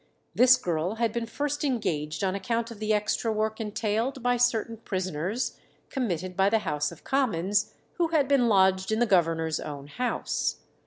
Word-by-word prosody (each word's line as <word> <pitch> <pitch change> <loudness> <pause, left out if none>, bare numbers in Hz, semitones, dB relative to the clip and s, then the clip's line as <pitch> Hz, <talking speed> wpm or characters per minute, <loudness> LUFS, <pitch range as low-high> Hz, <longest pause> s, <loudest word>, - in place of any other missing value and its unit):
This 255 +1 +6
girl 175 -2 -1
had 230 -1 0
been 235 -1 -2
first 290 +5 -2
engaged 170 - -1
on 190 -1 +1
account 230 +3 -2
of 220 - -10
the 215 0 -1
extra 210 +2 +1
work 220 +1 -1
entailed 225 +4 -2
by 245 0 +3
certain 235 -2 +1
prisoners 185 - -3 0.3
committed 185 - -2
by 195 +2 +4
the 225 - +3
House 150 -3 -1
of - - -13
Commons, 205 -8 0 0.2
who 340 - +3
had 310 -4 +2
been 270 -4 +3
lodged 190 -2 +3
in 220 - +2
the 240 - +3
governor's 165 -5 +2
own 145 -2 -6
house. 245 +12 -2
215 Hz, 170 wpm, -27 LUFS, 185-245 Hz, 0.3 s, This